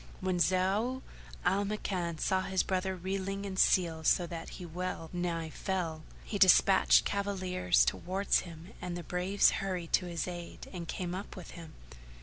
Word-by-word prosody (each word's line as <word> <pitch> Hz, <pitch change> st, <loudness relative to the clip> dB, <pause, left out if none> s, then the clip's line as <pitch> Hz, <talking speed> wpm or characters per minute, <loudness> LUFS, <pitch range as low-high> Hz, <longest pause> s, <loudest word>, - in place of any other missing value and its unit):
When 185 Hz, -1 st, -1 dB
Zau 195 Hz, +9 st, +1 dB, 0.4 s
al 190 Hz, +3 st, +3 dB
Makan 185 Hz, -5 st, -2 dB
saw 190 Hz, +3 st, +1 dB
his 190 Hz, 0 st, 0 dB
brother 190 Hz, 0 st, -1 dB
reeling 195 Hz, +2 st, -3 dB
in 195 Hz, -1 st, -4 dB
selle 170 Hz, -4 st, +3 dB
so 175 Hz, +3 st, +3 dB
that 165 Hz, -1 st, -7 dB
he 180 Hz, -, -7 dB
well 175 Hz, -1 st, -5 dB
nigh 170 Hz, -2 st, -2 dB
fell, 170 Hz, -5 st, -3 dB, 0.2 s
he 205 Hz, -, -4 dB
despatched 190 Hz, 0 st, +6 dB
cavaliers 185 Hz, -3 st, +1 dB
towards 190 Hz, +2 st, +1 dB
him 170 Hz, 0 st, -10 dB
and 180 Hz, -1 st, -4 dB
the 175 Hz, -, -6 dB
braves 180 Hz, +4 st, +2 dB
hurried 180 Hz, -4 st, -4 dB
to 180 Hz, -, +3 dB
his 170 Hz, -2 st, -3 dB
aid 175 Hz, -1 st, -7 dB
and 170 Hz, -2 st, -6 dB
came 175 Hz, +1 st, -3 dB
up 190 Hz, +3 st, -6 dB
with 185 Hz, -4 st, -9 dB
him. 165 Hz, -2 st, -11 dB
185 Hz, 160 wpm, -31 LUFS, 175-190 Hz, 0.4 s, despatched